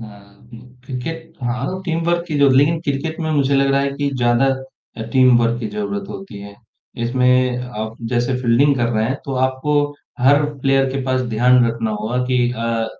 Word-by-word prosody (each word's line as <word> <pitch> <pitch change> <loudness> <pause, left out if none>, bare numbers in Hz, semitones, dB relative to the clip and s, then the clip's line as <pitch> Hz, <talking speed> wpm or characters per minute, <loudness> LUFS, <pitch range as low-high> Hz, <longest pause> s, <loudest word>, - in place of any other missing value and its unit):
हाँ, 105 -3 -11 0.3
उम, 115 - -10 0.3
क्रिकेट 160 +6 -6
हाँ, 125 +10 -3
team 165 -2 -1
work 170 0 +1
ही 150 - 0
जो 140 -1 +5
लिन 145 +5 +3
क्रिकेट 160 +2 -3
में 160 - -2
मुझे 140 -2 +1
लग 135 0 +2
रहा 140 - +3
है 140 0 0
कि 145 -1 -1
ज़्यादा 120 +1 +2 0.5
अ, 110 - -5
टीम 130 -2 +5
वर्क 120 0 +1
की 110 - -3
ज़रूरत 205 -1 -4
होती 195 - -8
है। 100 0 -10 0.5
इसमें 125 0 +2 0.2
आप 110 +1 -5
जैसे 120 +1 0
फील्डिंग 130 +4 +3
कर 120 -2 +1
रहे 110 -2 0
हैं, 130 +4 -1
तो 135 - -4
आपको 130 +3 -2 0.5
हर 145 +4 +4 0.2
प्लेयर 135 0 +3
के 135 0 -2
पास 130 0 0
ध्यान 125 +2 +4
रखना 115 -1 -2
होगा 110 +4 -2
कि 125 0 0
अ 115 -1 -2
130 Hz, 195 wpm, -19 LUFS, 120-145 Hz, 0.5 s, जो